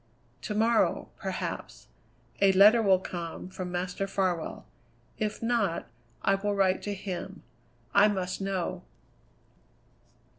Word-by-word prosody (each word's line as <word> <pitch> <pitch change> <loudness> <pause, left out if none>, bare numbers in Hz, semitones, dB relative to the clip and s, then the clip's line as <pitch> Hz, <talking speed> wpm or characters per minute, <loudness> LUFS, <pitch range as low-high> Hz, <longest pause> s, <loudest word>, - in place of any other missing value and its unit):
"To 210 - -4
morrow, 225 +1 +2
perhaps, - - -5 0.5
a 195 -1 +6
letter 210 +5 +7
will 195 -3 +5
come 175 -1 -6
from 185 -1 -6
Master 180 +2 -2
Farwell; 185 -4 -2 0.5
if 215 +1 -2
not, 230 -7 0 0.4
I 195 - +3
will 205 +1 0
write 190 -1 +2
to 205 -1 -3
him. 195 0 -6 0.5
I 205 +1 +7
must 190 -2 -2
know." 185 -2 -2
195 Hz, 115 wpm, -29 LUFS, 185-205 Hz, 0.5 s, letter